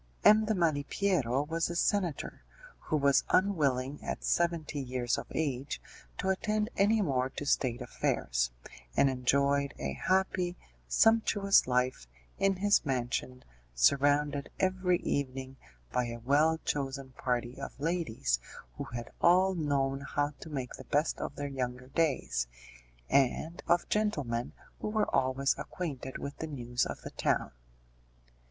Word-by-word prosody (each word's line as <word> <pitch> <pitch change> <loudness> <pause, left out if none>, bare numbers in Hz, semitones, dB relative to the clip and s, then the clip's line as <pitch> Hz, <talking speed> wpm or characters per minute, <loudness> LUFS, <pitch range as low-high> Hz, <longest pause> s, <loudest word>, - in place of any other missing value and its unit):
M. 215 +1 +7
de 215 0 +1
Malipiero 150 -4 +1
was 165 +1 0
a 175 - -4
senator, 175 -4 0 0.4
who 155 - -1
was 140 -2 +4
unwilling 145 -8 +2
at - - -4
seventy 170 -4 0
years 125 -2 -1
of - - -6
age 140 -3 -2 0.4
to 190 - -1
attend 215 +3 0
any 210 +2 +3
more 130 -5 0
to 145 - -6
State 125 -4 +1
affairs, - - 0 0.5
and 140 - +5
enjoyed 140 +2 +1
a 70 0 -3
happy, 185 - 0 0.3
sumptuous 205 - +4
life 125 - 0 0.3
in 195 0 +3
his 205 +2 +3
mansion, 125 -2 -2 0.3
surrounded 145 - +3
every 185 -1 +2
evening 135 -1 -2 0.4
by 125 - +1
a 120 0 -5
well 155 +4 +4
chosen 135 -1 -2
party 125 0 -2
of 135 - -7
ladies 150 - 0 0.4
who - - -4
had 120 -1 -7
all 185 +2 +5
known 140 -5 0
how 145 +1 -1
to 160 - -9
make 135 -4 -4
the - - -9
best 150 +3 0
of 140 - -4
their 145 - -3
younger 125 -2 -4
days, 130 - 0 0.6
and 140 - +1
of 170 +1 +3
gentlemen 145 - -1 0.3
who - - -3
were 215 0 0
always 130 +1 +2
acquainted 140 -7 -5
with 140 - -6
the 160 - -4
news 125 -4 -1
of - - -6
the - - -7
town. - - 0
140 Hz, 140 wpm, -31 LUFS, 130-175 Hz, 0.6 s, M